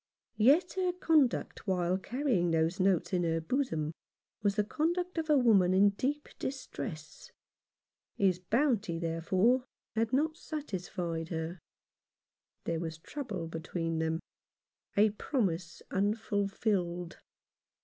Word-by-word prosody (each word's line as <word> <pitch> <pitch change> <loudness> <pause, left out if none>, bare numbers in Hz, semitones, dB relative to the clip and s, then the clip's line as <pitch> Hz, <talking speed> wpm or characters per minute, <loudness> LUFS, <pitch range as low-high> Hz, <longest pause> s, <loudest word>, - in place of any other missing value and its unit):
Yet 300 +11 +5
her 365 -1 +1
conduct 310 -11 +1
while 180 0 +1
carrying 235 -6 0
those 165 +3 +1
notes 185 -2 +2
in 180 - +2
her 165 -1 +1
bosom 160 - -1 0.5
was 200 -1 +2
the 210 - +2
conduct 345 - -1
of 320 -1 -3
a 300 - +6
woman 200 -8 +5
in 200 +2 +6
deep 285 +8 -2
distress. 155 - -6 0.9
His 185 -3 +3
bounty, 215 - +1
therefore, 185 +9 +2 0.3
had 225 +1 0
not 310 +5 +1
satisfied 180 - -4
her. 165 +1 -4 1.0
There 165 -1 -1
was 160 -1 -4
trouble 200 - -5
between 165 0 -3
them 160 0 0 0.4
— - - -36
a 210 +1 +6
promise 185 - -2
unfulfilled. 200 -3 0
195 Hz, 120 wpm, -31 LUFS, 170-255 Hz, 1.0 s, a